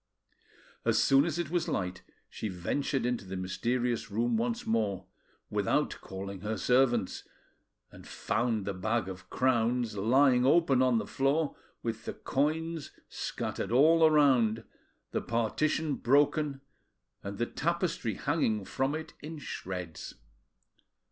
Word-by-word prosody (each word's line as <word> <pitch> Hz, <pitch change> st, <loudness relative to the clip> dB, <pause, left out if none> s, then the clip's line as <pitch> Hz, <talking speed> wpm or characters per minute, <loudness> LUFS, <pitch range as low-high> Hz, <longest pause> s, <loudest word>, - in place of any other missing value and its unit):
As -, -, +2 dB
soon 135 Hz, +2 st, +5 dB
as 170 Hz, -2 st, -2 dB
it 170 Hz, -3 st, -3 dB
was 175 Hz, -1 st, 0 dB
light 90 Hz, 0 st, -2 dB, 0.3 s
she -, -, -5 dB
ventured 125 Hz, -, -1 dB
into 125 Hz, -3 st, -1 dB
the 95 Hz, 0 st, -7 dB
mysterious 120 Hz, +6 st, -1 dB
room 115 Hz, +3 st, 0 dB
once 115 Hz, +1 st, -1 dB
more; 105 Hz, -4 st, 0 dB, 0.5 s
without -, -, 0 dB
calling 95 Hz, 0 st, -7 dB
her 105 Hz, +2 st, -2 dB
servants, 120 Hz, -3 st, +2 dB, 0.7 s
and -, -, -13 dB
found 115 Hz, -4 st, -1 dB
the 100 Hz, -, -2 dB
bag 110 Hz, +2 st, -1 dB
of 95 Hz, 0 st, -8 dB
crowns 120 Hz, -3 st, +1 dB
lying 125 Hz, +5 st, +4 dB
open 135 Hz, -1 st, +4 dB
on 130 Hz, -2 st, +4 dB
the -, -, -1 dB
floor, 140 Hz, +3 st, 0 dB, 0.3 s
with 115 Hz, -1 st, -4 dB
the -, -, -3 dB
coins 155 Hz, +2 st, -1 dB, 0.2 s
scattered -, -, -4 dB
all 160 Hz, +6 st, +5 dB
around, 130 Hz, -8 st, +4 dB, 0.5 s
the -, -, -1 dB
partition 145 Hz, +7 st, 0 dB
broken, 145 Hz, +2 st, +2 dB, 0.6 s
and 100 Hz, 0 st, -6 dB
the 120 Hz, -, 0 dB
tapestry 165 Hz, -, -1 dB
hanging 110 Hz, -9 st, 0 dB
from 135 Hz, +8 st, -1 dB
it 160 Hz, 0 st, -6 dB
in 155 Hz, +2 st, -7 dB
shreds. 90 Hz, -, -6 dB
120 Hz, 130 wpm, -30 LUFS, 110-145 Hz, 0.7 s, soon